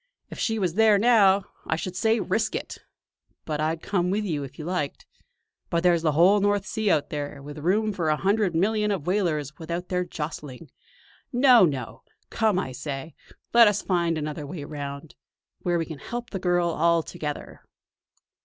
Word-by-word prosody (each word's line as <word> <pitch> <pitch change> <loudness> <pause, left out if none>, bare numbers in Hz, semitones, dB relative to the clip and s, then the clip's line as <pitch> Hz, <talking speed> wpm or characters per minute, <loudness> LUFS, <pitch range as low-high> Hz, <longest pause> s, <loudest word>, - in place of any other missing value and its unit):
If - - -8
she 225 -1 0
was 185 -5 0
there 215 +1 +5
now, 200 -3 +5 0.2
I - - +1
should 180 +2 -5
say 225 +3 +2
'risk 220 +1 -1
it'; - - -5 0.7
and 150 -1 -2
I'd 160 +1 -1
come 180 -3 0
with 210 +3 0
you 155 -7 -2
if 135 0 -10
you 155 - -7
liked. 175 -5 -3 0.6
But 170 0 0
there's 175 -2 +4
the 155 -2 +1
whole 180 +7 +5
North 205 0 +1
Sea 220 -1 -1
out 150 -6 +1
there, 145 -1 -4
with 145 +2 -9
room 205 +7 +1
for 170 -4 -1
a 155 - +3
hundred 195 0 +1
million 210 +4 +1
of 195 -8 -2
whalers 160 -7 -1
without 170 +2 -5
their 180 -1 0
jostling. 150 -4 -7 0.6
No, 245 -4 +6
no! 130 -5 -4 0.3
Come, 220 -4 +1
I 130 - -2
say, 135 +3 -6 0.4
let 235 -1 +8
us 205 -1 +1
find 170 -3 +1
another 150 -1 -4
way 160 -1 -6
round; 145 0 -7 0.5
where 175 -1 0
we 165 - -1
can 160 -4 -8
help 240 +8 -6
the 190 - -3
girl 175 -1 +1
all 170 0 +2
together!" 150 -4 -6
175 Hz, 180 wpm, -25 LUFS, 150-205 Hz, 0.7 s, let